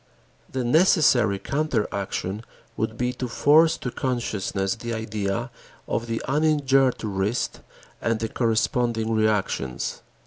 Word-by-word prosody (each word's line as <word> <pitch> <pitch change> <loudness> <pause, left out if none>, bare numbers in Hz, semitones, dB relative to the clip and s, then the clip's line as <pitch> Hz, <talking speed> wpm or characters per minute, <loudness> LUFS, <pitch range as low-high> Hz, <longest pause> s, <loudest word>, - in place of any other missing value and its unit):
The 130 -1 -2
necessary 125 - +4
counter 140 -1 -1
action 100 +1 -3 0.3
would 110 +1 -2
be 125 0 0
to 125 0 -4
force 155 +6 +4
to 125 - -4
consciousness 105 -7 -1
the 115 0 -5
idea 110 +1 -3 0.4
of 115 - -2
the 115 -1 -3
uninjured 135 -3 +2
wrist 105 +3 -1 0.4
and 115 -1 0
the 110 - -1
corresponding 115 -1 0
reactions. 105 - -1
115 Hz, 115 wpm, -24 LUFS, 110-130 Hz, 0.4 s, necessary